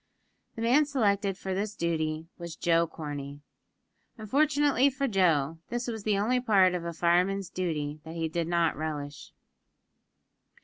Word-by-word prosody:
The 225 - -4
man 260 +6 +4
selected 200 -8 +1
for 190 -1 -4
this 205 +2 -2
duty 160 -2 -1
was 170 -2 -7
Joe 170 0 +2
Corney. 145 -3 -7 0.8
Unfortunately 280 +3 +2
for 275 +1 -2
Joe, 165 - +2
this 240 +1 -3
was 225 -2 -4
the 210 -2 +2
only 235 +5 +2
part 195 -7 +4
of 180 -2 -3
a 170 - -3
fireman's 180 +3 +1
duty 155 -5 -3
that 160 +1 -9
he 165 -1 -1
did 165 +1 -2
not 170 -1 +1
relish. 145 -2 -5
180 Hz, 145 wpm, -28 LUFS, 160-220 Hz, 0.8 s, man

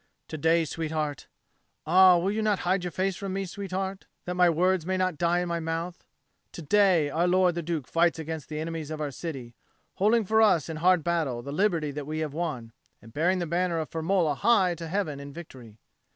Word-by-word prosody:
To 155 - -5
day, 165 +2 +3
sweetheart 155 -2 -4 0.6
ah, 185 +2 +6
will 185 +3 0
you 220 +1 -1
not 210 -2 +1
hide 185 +1 +1
your 180 - -2
face 190 +2 -1
from 195 0 -5
me, 195 0 -2
sweetheart, 190 +1 -5 0.2
that 180 - -3
my 180 -1 +4
words 180 +2 +1
may 185 +3 -1
not 185 -4 -1
die 175 +1 +2
in 180 - -3
my 170 0 -2
mouth? 165 +2 -4 0.5
to 170 - -8
day 175 -3 +3
our 170 +4 +1
lord 180 0 +3
the 170 - -3
Duke 160 -4 -3
fights 170 0 +2
against 160 -1 -6
the 155 -1 -4
enemies 160 -1 -5
of 155 -1 -5
our 150 -2 -3
city, 130 -5 -7 0.4
holding 215 +3 +3
for 220 +3 +3
us 175 -8 +3
in 160 - -4
hard 180 0 +3
battle 155 -8 -1
the 140 - -6
liberty 165 -3 0
that 145 0 -6
we 155 +1 -4
have 155 -2 -3
won, 140 -9 -4 0.3
and 115 +1 -16
bearing 175 +5 +1
the 175 - -2
banner 170 +1 0
of 160 -1 -4
Firmola 165 -2 +1
high 200 -5 +3
to 165 0 -7
heaven 160 -5 -2
in 140 0 -9
victory." 130 -9 -12
170 Hz, 215 wpm, -27 LUFS, 155-185 Hz, 0.6 s, ah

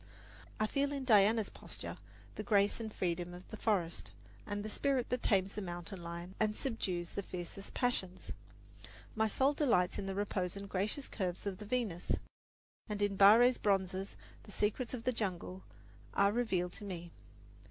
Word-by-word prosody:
I 215 - +3
feel 280 +5 +1
in 280 -2 -2
Diana's 215 -1 +5
posture - - -7 0.3
the - - -4
grace 205 -1 +3
and 220 -1 -4
freedom 175 -2 -2
of 180 - -11
the - - -4
forest 185 -8 0 0.4
and 205 0 -3
the - - -3
spirit 270 -1 +1
that 250 0 0
tames 195 -2 +2
the 210 - -3
mountain 175 0 -6
lion 170 +2 -6
and 215 -1 +2
subdues 190 -10 -2
the - - -3
fiercest 185 +1 -7
passions. 190 -7 -1 0.8
My 220 0 +3
soul 270 +6 +3
delights 235 - +2
in 195 - -3
the 195 - -2
repose 195 -3 -1
and 200 0 -6
gracious 205 +9 -1
curves 185 -3 -3
of 200 -1 -3
the 210 - -7
Venus; 210 -6 -1 0.8
and 210 -1 -2
in 205 -1 +1
Barre's 225 +6 +7
bronzes 195 -1 0 0.3
the 205 - -13
secrets 220 +5 0
of 230 - -7
the 255 - +1
jungle 185 -3 -3 0.5
are 200 0 +5
revealed 195 -6 0
to - - -8
me. 175 -4 -6
200 Hz, 170 wpm, -35 LUFS, 185-225 Hz, 0.8 s, Barre's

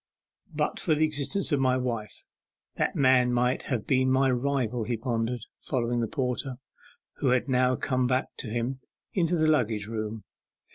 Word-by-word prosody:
'But - - -1
for 155 - +1
the 155 +1 +3
existence 155 +6 +1
of 145 - +2
my 130 -1 +3
wife 115 -4 -4 0.5
that - - -1
man 130 -2 +4
might 125 +1 +1
have 120 -6 -1
been 130 -1 +2
my 130 0 +3
rival,' 125 -2 0
he 120 0 -1
pondered, 120 0 -2 0.2
following 120 -2 -1
the 115 - 0
porter, 130 -2 -2 0.6
who 140 - -1
had 125 +1 +2
now 130 -1 +3
come 130 0 0
back 130 +1 -1
to - - -5
him, 120 +4 -2 0.3
into 175 -2 +1
the 160 -2 +2
luggage 115 -9 +1
room. 110 0 -4
125 Hz, 165 wpm, -27 LUFS, 120-135 Hz, 0.6 s, man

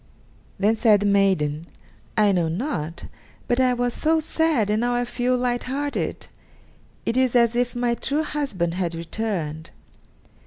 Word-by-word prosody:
Then 210 +3 +2
said 215 -3 +4
the - - 0
maiden: 185 -6 +2 0.5
"I 210 -2 +5
know 175 -4 +1
not, 170 - -3 0.4
but 245 - +1
I 255 -1 +3
was 245 0 0
so 320 +1 +2
sad, 310 -9 +1
and 215 +1 +1
now 245 0 +1
I 245 0 0
feel 250 +1 0
light 245 -1 -1
hearted; 285 +2 -3 0.8
it 230 - 0
is 260 -1 +2
as 235 -1 +4
if 245 0 0
my 240 0 +1
true 285 +6 -1
husband 260 - -2
had 175 -2 -2
returned." 165 -3 -4
235 Hz, 155 wpm, -23 LUFS, 185-250 Hz, 0.8 s, I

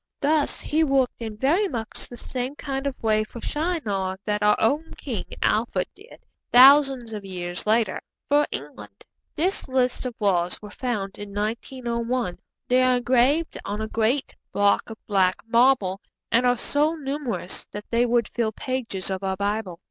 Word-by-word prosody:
Thus 295 0 +1
he 315 +2 +1
worked 270 -5 +1
in 220 -2 -5
very 325 - +2
much 230 - -5
the 240 - -9
same 255 +3 -4
kind 275 -1 -3
of 265 -3 -5
way 215 -1 +3
for 225 +2 -10
Shinar 225 - -2
that 210 0 -1
our 210 0 +5
own 295 +8 0
King 235 -9 -4 0.2
Alfred 210 -4 +1
did, 420 +5 -17 0.3
thousands 265 -2 +7
of 210 -2 -5
years 180 -1 -4
later, 220 -2 +2 0.3
for 290 +1 +3
England. 105 -8 -8 0.3
This 365 +6 0
list 255 -1 0
of 245 - -7
laws 180 -4 +1
was 210 -1 -11
found 210 -7 -3
in 205 -1 -8
1901. 235 0 -2 0.3
They 250 +1 +4
are 255 -1 +4
engraved 260 +6 +2
on 205 +1 -4
a 220 - -2
great 230 +6 0 0.2
block 205 +2 +2
of 225 - -8
black 190 -3 +3
marble, 230 -5 +3 0.3
and 235 +2 +4
are 245 0 +3
so 295 +6 +1
numerous 270 - -3
that 205 0 -8
they 240 +1 +3
would 235 -1 +2
fill 230 -2 -1
pages 225 -8 -3
of 190 0 -3
our 190 0 -1
Bible. 200 -3 -2
235 Hz, 165 wpm, -24 LUFS, 205-270 Hz, 0.3 s, thousands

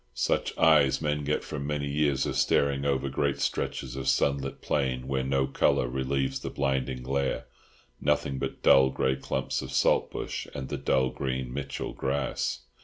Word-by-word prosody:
Such - - 0
eyes 75 -4 +5
men 75 -1 -1
get 75 +1 0
from 70 +1 -5
many 75 -1 -1
years 70 -2 +1
of - - -2
staring 70 -1 +2
over 70 -1 +1
great 70 +1 -1
stretches 65 -2 -2
of 65 - -4
sunlit 70 -1 +1
plain 65 -3 -1
where 65 -1 0
no 65 0 +1
colour 65 -2 +2
relieves 65 +1 -1
the - - -5
blinding 65 -2 -1
glare—nothing 70 0 -2
but 65 - -4
dull 65 0 +7
grey 65 0 0
clumps 65 0 -2
of 65 -1 -7
saltbush 65 - 0
and 65 - -5
the - - -2
dull 65 -1 +2
green 65 -2 -3
Mitchell 70 0 -4
grass. 70 -2 -2
65 Hz, 160 wpm, -28 LUFS, 65-70 Hz, -, dull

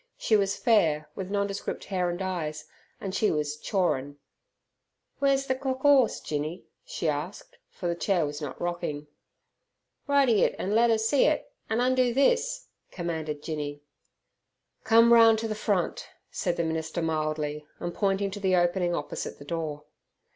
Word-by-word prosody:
She 220 - +2
was 200 -1 +2
fair, 160 - +2
with 190 +2 -6
nondescript 200 0 -2
hair 180 -2 -1
and 175 +1 -4
eyes, 160 -5 -3 0.3
and 190 -2 -5
she 215 - +2
was 150 -1 -1
"chawrin'". 145 -8 -1 1.0
"Wer's 275 -1 +2
ther 260 - +1
cock 260 0 -3
'orse, 270 -5 +5
Jinny?" 155 +3 -4 0.2
she 165 - -4
asked, 150 +6 -4
for 175 - -5
the 170 - +1
chair 175 -1 +1
was 145 +1 -5
not 150 - -6
rocking. 170 -4 -3 1.0
"Ridey 275 -7 +4
it - - +2
an' 195 - -2
let 235 +2 +4
'er 225 - +4
see 225 +6 +3
it; - - 0 0.2
an' 225 +2 +1
undo 255 -1 +2
this," 475 - +2 0.2
commanded 160 -4 -4
Jinny. 145 -2 -4 1.0
"Come 230 +1 +6
round 225 -1 +7
to 225 +1 -2
the 215 - -2
front," 205 -4 -1 0.2
said 175 -2 -2
the 170 - +1
minister 160 +1 -2
mildly, 155 -1 -2
and 175 0 -4
pointing 195 -1 0
to 205 - -6
the 190 -2 +2
opening 175 0 +1
opposite 145 - -5
the 145 - -12
door. 155 -2 -4
180 Hz, 160 wpm, -27 LUFS, 155-225 Hz, 1.0 s, round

